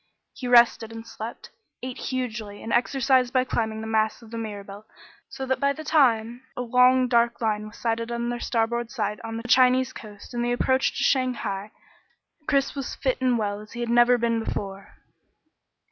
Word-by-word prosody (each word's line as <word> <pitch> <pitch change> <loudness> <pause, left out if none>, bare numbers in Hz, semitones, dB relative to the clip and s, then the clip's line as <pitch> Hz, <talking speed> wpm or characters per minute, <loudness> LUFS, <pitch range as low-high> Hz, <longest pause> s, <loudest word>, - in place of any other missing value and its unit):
He 255 - -6
rested 235 -2 +5
and 225 0 -8
slept, 225 0 -8 0.3
ate 255 -1 -5
hugely, 230 -5 -4
and 225 - -3
exercised 255 0 +2
by 255 -1 +3
climbing 220 -3 -2
up - - -5
the - - -5
masts 220 +1 0
of 225 - -14
the 230 - -5
Mirabelle, 205 -2 -7 0.5
so 265 - -6
that 260 0 0
by 280 0 +2
the 315 - -8
time 240 -6 +2 0.2
a 250 - -1
long 250 +1 +4
dark 235 -1 +2
line 215 -2 -1
was 215 - -13
sighted 230 0 -2
on 235 0 -2
their 240 0 -3
starboard 235 0 -1
side 210 -4 -3
on 225 0 -5
the 230 +1 -6
Chinese 255 +1 +4
coast 210 +1 -11
and 240 0 -1
the 240 0 0
approach 260 +2 +1
to - - 0
Shanghai, 240 -7 0 0.8
Chris 275 -2 +1
was 275 -3 -5
fit 260 -2 -1
and 250 -2 +2
well 205 -2 -2
as 215 +1 -12
he 240 - -7
had 240 -1 -2
never 240 +1 +5
been 230 -1 0
before. 195 -2 -6
235 Hz, 190 wpm, -25 LUFS, 220-255 Hz, 0.8 s, rested